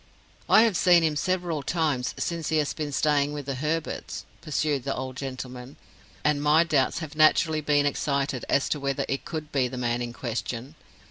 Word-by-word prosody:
"I 220 - +7
have 225 -5 +2
seen 175 -1 +5
him 155 -2 +1
several 175 -2 -1
times 145 -5 -1
since 170 -2 -2
he 160 - +2
has 150 -2 0
been 150 -2 -4
staying 145 0 +2
with 145 -2 -5
the 140 - -2
Herberts," 155 +4 -3 0.2
pursued 150 -3 -1
the 135 +1 -2
old 130 0 -5
gentleman, 130 -1 -7 0.5
"and 150 -1 +2
my 150 +3 +5
doubts 145 -6 +1
have 155 0 -12
naturally 155 0 +4
been 145 -1 +2
excited 140 -2 -1
as 140 - +2
to 150 - -1
whether 140 -1 -1
it 135 - -3
could 155 -2 -5
be 130 -3 +1
the 125 +1 -7
man 120 -1 -1
in 120 -1 -3
question. 120 +2 -4
145 Hz, 190 wpm, -26 LUFS, 130-155 Hz, 0.5 s, I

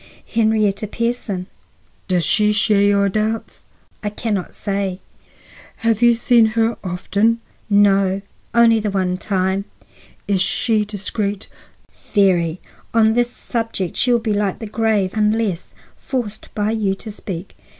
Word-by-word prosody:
"Henrietta 215 -2 +2
Pierson." 230 -5 -2 0.6
"Does 180 -4 +1
she 210 +5 +3
share 210 -1 +3
your 200 0 +3
doubts?" 215 +3 -2 0.3
"I 210 - -2
can 215 +1 -3
not 190 -3 -3
say." 195 -2 -2 0.8
"You 230 0 +4
have 235 +2 +4
seen 240 -1 +5
her 225 0 +2
often?" 200 +5 0 0.3
"No, 195 -1 +3 0.3
only 235 -1 +5
the 210 -1 -1
one 185 -2 -1
time." 190 0 0 0.6
"Is 195 -2 +1
she 215 +3 +1
discreet?" 205 0 -3 0.7
"Very. 180 -4 +3 0.4
On 220 -1 +5
this 240 +1 +2
subject 225 -7 -4
she 250 - +2
will 240 - +5
be 225 -2 -1
like 205 -2 0
the 225 - -7
grave 215 -3 +1
unless 210 -4 0 0.3
forced 230 -6 -4
by 210 0 0
you 210 -4 0
to 215 +2 -8
speak." 190 -3 -7
210 Hz, 135 wpm, -20 LUFS, 195-225 Hz, 0.8 s, seen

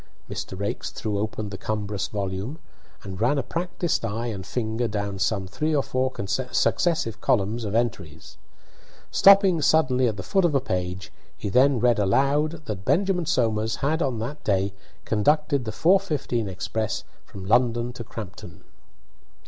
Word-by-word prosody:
Mr. 95 - -6
Raikes 100 - -3
threw 105 -2 -3
open 110 0 -3
the 95 - -7
cumbrous 105 -2 -2
volume, 100 +6 -4 0.5
and 95 0 -7
ran 125 +6 +3
a 135 - 0
practised 175 -3 -2
eye 115 +1 -2
and 105 -5 -4
finger 115 0 -1
down 100 -2 -3
some 95 0 0
three 150 +12 -1
or 140 - +2
four 130 0 0 0.4
successive 135 -11 +1
columns 110 +2 +1
of 105 +1 -3
entries. 95 -10 -3 0.7
Stopping 195 -4 +6
suddenly 130 -5 +3
at 110 -3 -2
the 95 - -5
foot 195 - +1
of 165 -4 +2
a - - +5
page, 95 -4 -4 0.2
he 105 - -4
then 130 +3 +4
read 120 -1 +3
aloud 145 +9 +1
that 100 -3 -5
Benjamin 180 - +1
Somers 110 -6 +1
had 160 +3 +1
on 130 -6 0
that 120 +7 -5
day 100 -1 +1 0.3
conducted 145 +4 +2
the 110 - -3
4:15 155 - +1
express 110 +3 -3 0.2
from 95 -1 -10
London 120 +2 +2
to 120 - -7
Crampton. 110 -4 -9
115 Hz, 155 wpm, -25 LUFS, 100-145 Hz, 0.7 s, Stopping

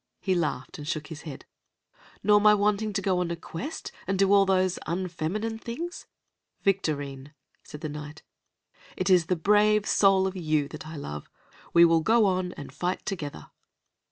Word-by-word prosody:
He 190 - 0
laughed 170 -2 -2
and 145 - -7
shook 155 -1 -3
his 160 -2 -8
head. 135 - -9 0.8
"Nor 210 +1 +5
my 210 0 +7
wanting 210 +1 +1
to 195 0 -1
go 185 -2 +1
on 180 -1 -1
a 170 - -2
quest, 170 - -7 0.2
and 195 0 0
do 195 +1 +4
all 200 -1 +5
those 185 -1 +2
unfeminine 185 +5 -3
things?" 325 +11 -6 0.6
"Victorine," 145 -7 -1 0.3
said 150 - -10
the 155 - -4
Knight, 150 0 -8 0.7
"it 185 +1 +1
is 175 -3 +5
the 180 - +2
brave 210 +4 +3
soul 195 -1 +4
of 190 0 -2
you 155 -5 0
that 155 0 -9
I 160 - -8
love. 75 - -7 0.4
We 170 0 +7
will 165 -1 +4
go 225 +5 +4
on 185 -2 0
and 140 -2 -10
fight 180 +5 -3
together." 145 - -5
180 Hz, 175 wpm, -27 LUFS, 155-200 Hz, 0.8 s, my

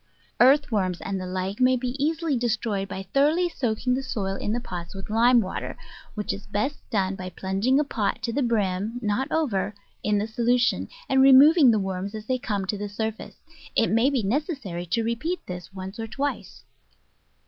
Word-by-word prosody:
Earth 275 +3 +5
worms 185 -5 0
and 195 -1 -3
the 185 - -5
like 185 +3 -3
may 255 0 +5
be 250 0 -2
easily 320 -1 0
destroyed 220 -4 -1
by 195 0 -5
thoroughly 295 - +2
soaking 250 -5 -1
the 260 - 0
soil 200 -7 -3
in 210 - -3
the 235 - 0
pots 175 -5 -7
with 195 +2 -8
lime 235 +2 +5
water, 185 - -5 0.4
which 210 -1 -2
is 200 - -9
best 215 +8 -2
done 195 -3 0
by 185 -1 -6
plunging 195 +9 0
a - - +3
pot 235 -6 -2
to 235 -2 -2
the 285 - 0
brim 215 -2 0
(not 215 +5 -1
over) 210 -10 0 0.3
in 210 0 +2
the 205 - 0
solution, 240 +2 +1 0.2
and 265 0 +3
removing 275 +2 +8
the 225 - +4
worms 195 +1 -3
as 215 0 -7
they 255 +2 -1
come 205 -5 -2
to 200 +2 -3
the 205 0 -4
surface. 220 +1 -4 0.4
It 225 - +3
may 230 +5 +4
be 265 -6 0
nec 265 +10 +1
essary 190 - -5
to 230 +6 +1
repeat 235 +11 -2
this 180 0 -7
once 190 +2 -8
or 225 - -3
twice. 280 +5 -4
220 Hz, 195 wpm, -25 LUFS, 195-260 Hz, 0.4 s, removing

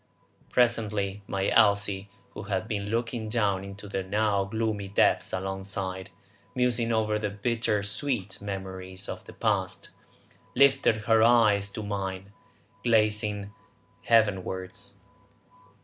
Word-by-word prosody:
Presently 105 -5 +1
my 95 0 -1
Elsie, 100 -2 +3 0.2
who - - -8
had 100 0 -2
been 100 -2 -3
looking 115 0 -2
down 100 -4 +1
into 100 +1 -9
the 95 -1 -2
now 100 +1 +1
gloomy 110 -1 -2
depths 100 - +2
alongside, 95 0 -4 0.5
musing 120 -2 +1
over 110 -1 +1
the 105 -1 -1
bitter 105 0 0
sweet 100 -2 -2
memories 95 -1 -6
of - - -6
the - - -11
past, - - -1 0.7
lifted 135 -5 +4
her 110 +1 +4
eyes 110 -4 +4
to 110 - -5
mine, 100 -1 -4 0.5
glancing 105 -3 +1 0.5
heavenwards. 95 -4 +1
105 Hz, 115 wpm, -27 LUFS, 95-110 Hz, 0.7 s, lifted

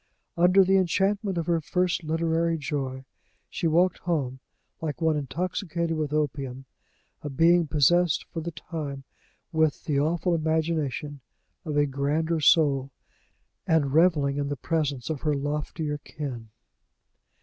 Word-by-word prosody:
Under 180 +3 +5
the 190 +1 +3
enchantment 195 +2 +1
of 165 - -1
her 170 -1 +1
first 180 +2 0
literary 165 +1 0
joy, 135 -3 -4 0.5
she 170 - -1
walked 175 +3 +2
home 140 -7 -2 0.4
like 155 -2 -3
one 160 -2 +2
intoxicated 170 - -2
with 155 -2 -2
opium 135 -3 -2 0.6
a 150 - -5
being 165 +4 +4
possessed 160 +3 +3
for 165 - -4
the 170 - -4
time 150 -4 -6 0.5
with 160 -3 +1
the 145 -3 0
awful 170 +4 +1
imagination 155 -3 -1 0.4
of 150 -2 -2
a 145 - +4
grander 150 +4 0
soul, 145 -4 +4 0.8
and 145 -4 +2
reveling 150 -4 +3
in 140 -1 -1
the 145 - -2
presence 145 -3 -1
of 150 - -4
her 150 -2 +1
loftier 150 +1 -3
kin. 135 -8 -7
155 Hz, 135 wpm, -26 LUFS, 145-170 Hz, 0.8 s, Under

